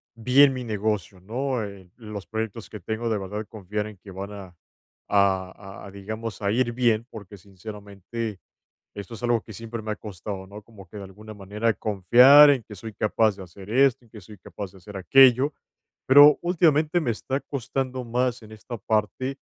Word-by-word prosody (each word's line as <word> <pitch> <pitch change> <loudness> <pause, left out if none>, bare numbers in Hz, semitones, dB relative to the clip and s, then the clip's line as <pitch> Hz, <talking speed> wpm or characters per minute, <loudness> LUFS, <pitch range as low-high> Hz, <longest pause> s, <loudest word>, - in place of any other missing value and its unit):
bien 130 +4 +5
mi 130 -1 -5
negocio, 105 -3 -3
¿no?, 125 +3 -3
en 95 -3 -12
los 105 -4 -8
proyectos 110 0 -5
que 105 - -9
tengo 110 +4 -3
de 110 - 0
verdad 105 +3 -5
confiar 105 +1 -5
en 105 - -11
que 95 +2 -13
van 95 +2 -7
a 95 -3 -11 0.5
a 95 -2 +2 0.3
a - - -9
a, - - -11
digamos 110 +2 -7
a 100 - 0
ir 120 +1 +1
bien, 115 -2 +1
porque 105 -2 -10
sinceramente, 100 +2 -8 0.6
esto 100 +3 -8
es 120 - -12
algo 120 -2 +1
que 110 - -13
siempre 115 +2 -7
me 110 - -4
ha 105 - -4
costado, 95 -1 -7
¿no?, 105 +2 -11
como 100 -4 -15
que 85 - -17
de 100 - -7
alguna 105 +3 -12
manera 105 +3 -1
confiar 125 +10 +6
en 130 -4 0
que 105 - -12
soy 110 +3 -9
capaz 105 0 +1
de 95 - -8
hacer 95 +3 -13
esto, 130 0 +3
en 115 - -27
que 110 - -11
soy 105 +3 -14
capaz 95 +2 -8
de - - -15
hacer 100 +3 -12
aquello. 135 - +5 0.5
Pero, 145 +2 +8
últimamente 165 -1 +2
me 130 - -2
está 130 +4 -3
costando 130 -1 -4
más 125 +1 -1
en 110 - -14
esta 115 +3 -8
parte 110 +6 -2
110 Hz, 195 wpm, -24 LUFS, 100-120 Hz, 0.6 s, Pero